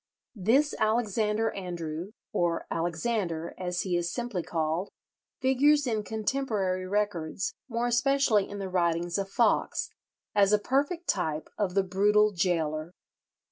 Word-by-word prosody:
This 250 +8 +2
Alexander 220 0 +1
Andrew 175 0 -5 0.2
or 175 -4 0
Alexander, 170 0 -1
as 180 -1 -2
he 185 -2 -1
is 175 0 0
simply 240 -5 -3
called, 165 +3 -1 0.5
figures 280 +3 +4
in 220 -4 0
contemporary 210 -5 -1
records, 190 -4 -1 0.2
more 235 0 -1
especially 240 -3 +3
in 205 - -6
the 195 -1 -4
writings 175 0 0
of 195 0 -3
Foxe, 230 +1 +1 0.4
as 200 0 +4
a - - +7
perfect 285 - -1
type 160 -4 -1
of 195 -3 -1
the 195 - +4
brutal 210 +3 +3
gaoler. 165 -3 -1
200 Hz, 130 wpm, -28 LUFS, 175-225 Hz, 0.5 s, a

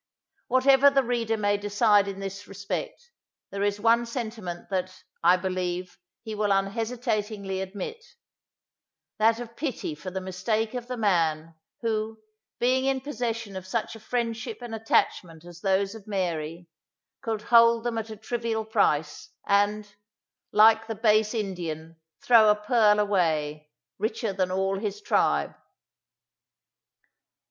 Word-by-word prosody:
Whatever 270 +2 +5
the 275 -1 +2
reader 230 -2 -1
may 205 -1 +1
decide 205 0 +3
in 195 -1 -5
this 195 +1 -6
respect, 480 - -6 0.4
there 200 - -4
is 205 0 0
one 230 +2 +3
sentiment 220 -7 -5
that, 185 0 -3 0.2
I 175 +2 +6
believe, 180 -1 -3 0.2
he 220 -2 -6
will 210 -1 0
unhesitatingly 210 -1 -1
admit: 200 - -6 1.2
that 225 +1 +4
of 235 -1 -8
pity 270 - -3
for 150 +5 -7
the 190 +1 -4
mistake 190 +5 -2
of 245 -1 -5
the 250 -1 -4
man, 165 -6 +1 0.3
who, 220 -1 -2 0.4
being 260 +2 +2
in 270 -1 +1
possession 230 -7 -4
of 185 0 -7
such 225 +3 -2
a - - -10
friendship 230 0 -3
and 235 -2 -7
attachment 180 -6 0
as 175 -1 -12
those 195 0 +1
of 220 -2 -12
Mary, 170 -4 -3 0.5
could 220 -2 -3
hold 230 0 +5
them 235 -2 -1
at 220 0 -6
a 215 - -8
trivial 225 0 -3
price, 160 -9 0 0.2
and, 205 +1 +1 0.6
"like 220 +1 +5
the 225 - -4
base 215 0 +2
Indian, 165 -6 -4 0.3
throw 225 -3 +6
a 210 - +5
pearl 210 0 +3
away, 155 -7 0 0.3
richer 220 0 -2
than 185 -1 0
all 190 +1 0
his 205 -1 -4
tribe. - - +1
210 Hz, 135 wpm, -26 LUFS, 190-230 Hz, 1.2 s, I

